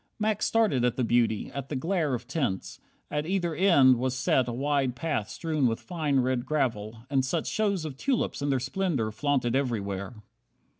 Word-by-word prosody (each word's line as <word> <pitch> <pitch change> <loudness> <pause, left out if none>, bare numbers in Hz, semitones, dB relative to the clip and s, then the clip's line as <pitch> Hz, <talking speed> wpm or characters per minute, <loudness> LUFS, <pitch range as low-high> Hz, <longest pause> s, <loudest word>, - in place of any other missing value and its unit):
Max 215 -1 0
started 215 - +2
at 125 -1 +2
the 130 - 0
beauty, 115 -2 +1
at 140 -1 -5
the 150 - -3
glare 160 -1 0
Of 120 0 -7
tints. 130 - -2 0.3
At 150 +1 -2
either 175 -3 0
end 145 -8 +5
was 130 +1 -1
set 130 -1 +2
a - - -2
wide 135 0 0
Path 145 -6 -2
strewn 155 -5 0
with 115 0 -1
fine, 150 -6 0
red 125 -1 0
gravel, 115 -6 -2
and 135 -1 +1
such 155 +5 -1
shows 200 -6 0
Of 140 -4 -6
tulips 260 - -1
in 145 - -1
their 135 -2 +2
splendour 135 - -1
flaunted 130 0 0
everywhere! 100 -6 -2
135 Hz, 185 wpm, -27 LUFS, 120-160 Hz, 0.3 s, end